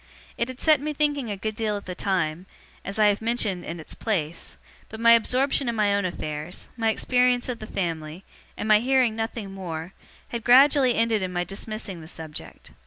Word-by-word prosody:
It 235 - -1
had 255 0 -8
set 310 -3 +4
me 300 +1 -2
thinking 290 -4 0
a 205 - -3
good 215 +2 -3
deal 215 -2 -1
at 200 - -9
the 185 - -5
time, 180 -2 -1 0.4
as 195 - -6
I 215 - +5
have 205 +1 0
mentioned 220 -5 0
in 170 +1 -6
its 160 - -8
place; 170 -7 -3 0.3
but 220 - -8
my 230 0 +6
absorption 255 +3 +3
in 235 - -2
my 210 -2 +2
own 200 -1 +1
affairs, 155 -1 -5
my 225 -2 +1
experience 250 +2 +2
of 245 - -3
the 215 - -8
family, 165 -2 -4 0.3
and - - -3
my 215 -1 +6
hearing 250 -2 +2
nothing 225 -2 -4
more, 175 -2 -6 0.4
had 235 -2 -4
gradually 260 +1 +6
ended 225 -2 +2
in 185 -1 -2
my 175 -1 -1
dismissing 195 -1 -6
the 155 - -11
subject. 160 -2 -9
215 Hz, 200 wpm, -25 LUFS, 180-240 Hz, 0.4 s, my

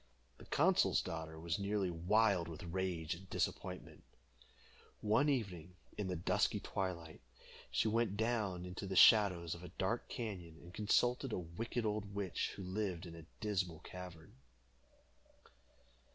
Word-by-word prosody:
The - - -11
consul's - - +4
daughter 80 -1 -5
was 85 +2 -1
nearly 100 -2 0
wild 90 +1 +3
with 80 -1 -7
rage 85 -1 -2
and 95 +2 -11
disappointment. - - -3 1.0
One 110 +8 +3
evening, 90 - -2 0.2
in 105 - -2
the 90 - -1
dusky 85 - +1
twilight, 85 -4 -4 0.5
she - - +1
went 110 -2 +1
down 105 -6 0
into 90 +2 -5
the 95 - -3
shadows 90 -5 +7
of 85 - -9
a - - -6
dark 110 +5 -1
cañon, 90 -8 -5
and 90 +1 -12
consulted 120 +5 +2
a - - 0
wicked 110 +7 -3
old 105 -1 -2
witch, 100 -3 -1
who 95 - -6
lived 95 -2 -2
in 85 - -8
a 85 -1 -11
dismal 95 -6 0
cavern. 90 -4 -9
95 Hz, 140 wpm, -37 LUFS, 85-105 Hz, 1.0 s, shadows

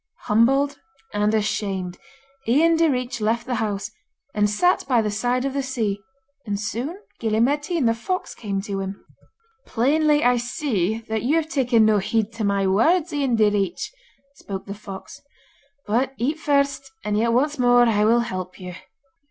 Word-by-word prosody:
Humbled 270 +6 +2 0.3
and 210 0 +2
ashamed, 195 -4 -2 0.5
Ian 320 +8 +4
Direach 255 -7 0
left 230 +3 0
the 255 - -3
house, 205 -1 -2 0.4
and 210 0 +2
sat 355 - +2
by 250 -3 +3
the 215 -2 0
side 245 +5 0
of 275 - -2
the 280 - 0
sea, 225 -7 -2 0.4
and 205 -3 -3
soon 245 - -3 0.2
Gille 220 -1 0
Mairtean 290 +5 +1
the 230 - +4
fox 365 +11 -3
came 200 -3 -3
to 200 -2 -4
him. 195 +1 -6 0.6
'Plainly 295 +5 +2
I 245 0 +4
see 230 - -1
that 220 -1 -1
you 275 +6 +1
have 320 -1 0
taken 245 -7 +3
no 215 -1 +4
heed 220 +2 0
to 225 -1 -4
my 200 -1 +1
words, 310 - +2
Ian 275 -5 +1
Direach,' 205 -3 +1 0.4
spoke 195 -7 -7
the 200 - -6
fox. 200 +6 -10 0.6
'But 250 +6 0
eat 290 +7 -1
first, 280 -2 0
and 210 0 -1
yet 230 +2 +2
once 285 +4 +1
more 245 0 +5
will 225 +1 +3
I - - -1
help 185 -5 -6
you. 180 -1 -7
230 Hz, 165 wpm, -23 LUFS, 210-275 Hz, 0.6 s, more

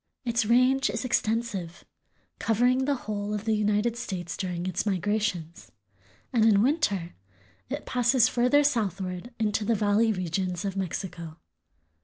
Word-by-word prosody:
Its 230 -2 +1
range 255 +2 +4
is 220 +5 -3
extensive, 215 -7 -1 0.5
covering 245 +4 +2
the 285 0 +1
whole 210 0 -3
of 210 +1 -5
the 220 - +2
United 210 +2 +1
States 185 -7 -5
during 180 -2 -3
its 185 - -1
migrations, 195 -4 -2 0.6
and 230 -3 +3
in 210 -2 +5
winter 210 - 0 0.6
it - - -4
passes 245 -1 +3
further 250 +5 +3
southward 195 - -1
into 215 -1 0
the 230 +2 +1
valley 210 +2 +2
regions 180 0 -2
of 195 -1 -3
Mexico. 180 -3 -5
210 Hz, 135 wpm, -27 LUFS, 185-235 Hz, 0.6 s, in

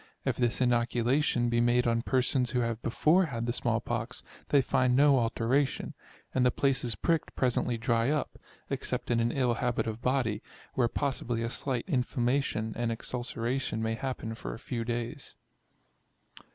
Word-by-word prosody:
If - - +1
this 120 0 0
inoculation 120 +1 +2
be 120 0 +2
made 120 +1 +3
on 115 -1 +2
persons 125 0 +1
who 125 +1 0
have 115 -1 -2
before 155 +10 +3
had 115 -6 -3
the 120 - -1
small 115 -2 +1
pox, 120 +1 -4 0.3
they 145 - +5
find 130 -2 +2
no 140 0 +5
alteration, 120 +4 0 0.4
and 130 - +2
the 125 - +5
places 125 -3 +1
pricked 165 - 0
presently 125 -1 +1
dry 115 +1 +1
up; 150 -1 -2 0.3
except - - -2
in 120 - +3
an 115 +1 +1
ill 125 -2 +1
habit 120 +1 -1
of 110 +1 -4
body, 125 -5 0 0.3
where 120 -2 +2
possibly 120 -3 -2
a 115 - -2
slight 125 -3 -2
inflammation 125 - 0
and 120 -1 -1
exulceration 120 0 -2
may 110 0 0
happen 115 -1 -4
for - - -6
a - - -9
few 115 -2 -4
days. 120 +4 -4
120 Hz, 165 wpm, -30 LUFS, 115-130 Hz, 0.4 s, they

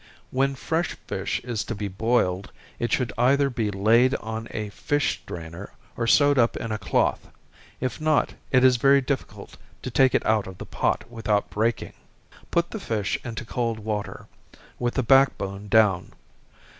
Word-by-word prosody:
When 135 +1 +1
fresh 165 +5 -2
fish - - -2
is 120 -3 -3
to 115 - -4
be 105 0 -3
boiled, 100 -2 0 0.3
it 120 - -1
should 125 -3 0
either 140 +3 +3
be 115 -4 -1
laid 115 +7 +3
on 110 -1 -5
a 105 -1 -4
fish 145 +7 -1
strainer, 85 +3 -8 0.2
or 115 - -2
sewed 145 +2 +5
up 115 -1 +3
in 115 - -4
a 110 - -2
cloth - - 0 0.5
if 130 +3 -3
not, 155 -1 +2 0.2
it 130 -1 +4
is 130 -1 +6
very 140 +3 +5
difficult 135 0 -5 0.3
to 130 - -4
take 130 +2 +4
it - - +1
out 110 -3 +2
of 95 -1 -9
the - - -8
pot - - -1
without 110 -3 -1
breaking. 115 +2 -1 0.6
Put 170 0 0
the 220 - -5
fish 110 - -2
into 115 -1 -6
cold 115 -1 -2
water, 105 -1 -4 0.5
with 120 0 -1
the 130 - +1
back 135 +2 +5
bone 100 +1 -6
down. 105 -4 +3
115 Hz, 170 wpm, -25 LUFS, 105-130 Hz, 0.6 s, is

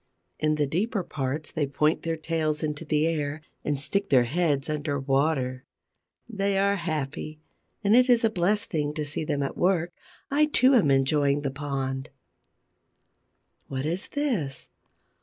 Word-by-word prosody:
In 155 0 +2
the 150 -1 +1
deeper 190 +7 -1
parts 145 0 -3
they 150 -3 -1
point 150 +3 +1
their 165 -1 -2
tails 155 -1 -1
into 150 +1 -2
the 150 -1 +1
air 155 -2 -1 0.2
and 145 -2 -1
stick 195 +9 -1
their 130 -3 +5
heads 145 +1 0
under 150 -2 -2
water. 135 -2 0 0.6
They 200 -3 -1
are 200 +1 +2
happy: 155 -2 -4 0.4
and 205 +2 +4
it 250 +1 +5
is 240 -2 +5
a 225 - +3
blessed 205 +3 +1
thing 150 -3 -1
to 155 -2 -2
see 145 +2 -2
them 145 -2 -1
at 135 - -3
work. 175 -2 +1 0.4
I 300 +2 +4
too 270 -3 +4
am 210 - +4
enjoying 140 +1 +3
the 140 - -1
pond. 135 -1 -3 1.6
What 135 0 -3
is 175 +5 -2
this? 225 - -2
155 Hz, 160 wpm, -26 LUFS, 140-180 Hz, 1.6 s, their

